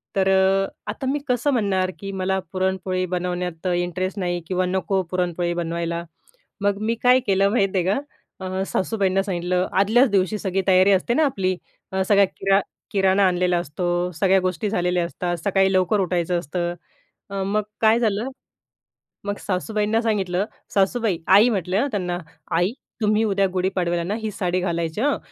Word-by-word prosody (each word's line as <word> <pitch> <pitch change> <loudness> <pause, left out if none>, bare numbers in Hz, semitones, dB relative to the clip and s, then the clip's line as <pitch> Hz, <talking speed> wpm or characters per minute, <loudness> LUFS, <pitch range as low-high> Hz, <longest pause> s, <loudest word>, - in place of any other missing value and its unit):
तर 190 -1 +2
अ, 190 0 +3 0.2
आता - - -6
मी 290 - -1
कसं 250 +3 +1
म्हणणार? 190 -5 +1
की 195 0 -5
मला 190 0 -1
पुरणपोळी 185 0 -1
बनवण्यात 180 -1 -3
अ, 180 - +1
इंटरेस्ट 185 +3 -2
नाही. 175 -1 -1
किंवा 185 0 0
नको 190 +1 0
पुरणपोळी 175 -1 -1
बनवायला, 170 0 -2 0.6
मग 200 0 +1
मी 230 +2 0
काय 250 +1 +6
केलं 195 0 +3
माहीत 200 -4 +2
आहे 180 - +2
का? 195 +8 +1 0.4
अ, 190 0 -3
सासूबाईंना 195 -1 0
सांगितलं 180 -1 -1
आदल्याच 230 +6 +4
दिवशी 195 +1 +1
सगळी 190 -1 -1
तयारी 190 +1 +5
असते 195 +5 +2
ना 310 +5 +3
आपली 190 -9 0 0.4
अ, 190 0 0
सगळा 200 -1 +5
किरा 195 +1 +1 0.3
किराणा 195 0 +3
आणलेला 180 -1 +1
असतो, 175 +3 -2
सगळ्या 190 +3 +3
गोष्टी 185 +2 -1
झालेल्या 180 -3 +1
असतात, 175 0 -3
सकाळी 195 -1 +3
लवकर 185 +3 +2
उठायचं 175 -1 0
असतं. 175 +2 -3 0.6
अ, 195 0 -3
मग 210 +2 0 0.2
काय 220 +1 +5
झालं, 220 +2 0 1.0
मग 205 0 -2
सासूबाईंना 210 +3 -1
सांगितलं, 200 -4 0 0.3
"सासूबाई", 200 0 +1
आई 205 +6 +7
म्हटलं 190 -2 0
हा 285 - +1
त्यांना, 180 -4 -2 0.3
"आई 175 +5 +2 0.3
तुम्ही 215 +1 +2
उद्या 200 -2 +2
गुढी 185 0 +1
पाडवायला 175 -2 0
ना 195 +5 -2
ही 215 -1 -3
साडी 185 -1 -1
घालायची 170 -2 -2
हं. 290 0 +2
190 Hz, 165 wpm, -23 LUFS, 180-200 Hz, 1.0 s, आई